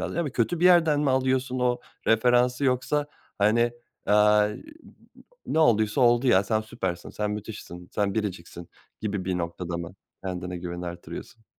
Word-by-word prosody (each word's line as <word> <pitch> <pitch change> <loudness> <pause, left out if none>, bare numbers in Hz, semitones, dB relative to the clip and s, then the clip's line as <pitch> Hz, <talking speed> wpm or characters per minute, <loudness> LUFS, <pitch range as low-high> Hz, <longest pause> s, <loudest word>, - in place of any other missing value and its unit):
lazım." - - -4
yani 155 -6 -1
kötü 160 +9 0
bir - - +2
yerden 165 -5 +5
mi 145 -3 +2
alıyorsun 130 0 0
o 125 -1 +1 0.3
referansı 125 +3 +3
yoksa, 135 +3 +1 0.3
hani, 115 +3 +3 0.3
aaa, 105 0 +5
eee, - - -6 0.3
u - - -17
u - - -22 0.3
u - - -1
"Ne 160 - +1
olduysa 110 -4 +3
oldu 120 +1 +4
ya, 100 -5 +4
sen 110 +2 +1
süpersin, 95 -5 -5
sen 105 0 -2
müthişsin, 105 -4 -7
sen 100 -1 0
biriciksin." 90 -5 -5 0.3
gibi 100 -3 -3
bir 90 -1 -1
noktada 85 0 -4
mı 85 +2 -7 0.3
kendine 90 -1 -4
güveni 90 0 -6
artırıyorsun? 90 +6 -9
110 Hz, 170 wpm, -26 LUFS, 95-125 Hz, 0.3 s, yerden